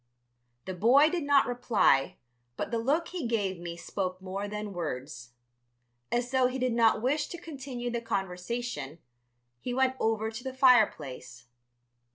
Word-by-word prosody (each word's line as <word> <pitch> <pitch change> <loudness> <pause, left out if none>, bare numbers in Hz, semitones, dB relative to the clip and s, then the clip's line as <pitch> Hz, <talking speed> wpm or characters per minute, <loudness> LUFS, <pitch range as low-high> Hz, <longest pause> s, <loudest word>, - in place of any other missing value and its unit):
The 190 - -4
boy 255 - +5
did 355 - -1
not 285 -3 +5
reply, 230 - +2 0.4
but - - -3
the 230 - 0
look 295 +8 0
he 345 -9 -3
gave 200 -6 -1
me 170 -1 -6
spoke 185 +2 -4
more 190 +2 -4
than 210 0 -5
words. 125 -7 -5 0.8
As 240 +1 0
though 260 -1 +4
he 255 +1 -3
did 255 -2 0
not 225 -1 +3
wish 290 +4 +1
to 345 - -7
continue 265 -7 -6
the 235 0 -2
conversation, 190 - -3 0.6
he 245 - -4
went 260 0 +2
over 220 0 0
to 225 +2 -8
the 265 -1 -5
fireplace. 145 - +2
230 Hz, 155 wpm, -29 LUFS, 185-255 Hz, 0.8 s, boy